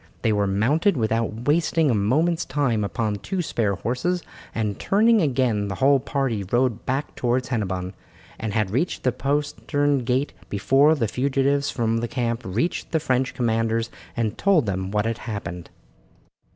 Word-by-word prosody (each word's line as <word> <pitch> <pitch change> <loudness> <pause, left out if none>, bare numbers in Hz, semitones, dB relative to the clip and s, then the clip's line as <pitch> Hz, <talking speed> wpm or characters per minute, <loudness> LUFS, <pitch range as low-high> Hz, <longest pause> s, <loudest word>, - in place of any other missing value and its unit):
They 110 - +3
were 100 -1 +1
mounted 140 - +2
without 115 0 -1
wasting 160 -1 +3
a - - +2
moment's 150 - +1
time 130 -7 0
upon 105 0 -1
two 180 - -3
spare 105 -9 0
horses, 145 - -1 0.3
and 105 -3 -2
turning 220 +2 +4
again 125 -8 +1
the 95 - -3
whole 135 +5 +4
party 130 -6 -1
rode 120 +3 0
back 135 +3 -1
towards 125 0 -1
Hennebon, 95 -6 -2 0.5
and 110 -1 -3
had 105 -3 0
reached 140 - -1
the 130 - +3
postern 145 +1 0
gate 130 +3 0 0.2
before 135 +9 +4
the 120 -7 0
fugitives 140 +4 +1
from 115 -2 0
the 120 - -2
camp 120 -1 -2
reached 115 - -2
the 160 - +2
French 130 -3 0
commanders 115 -1 0 0.3
and 110 -3 -1
told 190 -9 +3
them 95 -2 -2
what 105 +1 0
had 115 0 -2
happened. 90 -6 -6
120 Hz, 160 wpm, -24 LUFS, 110-140 Hz, 0.5 s, turning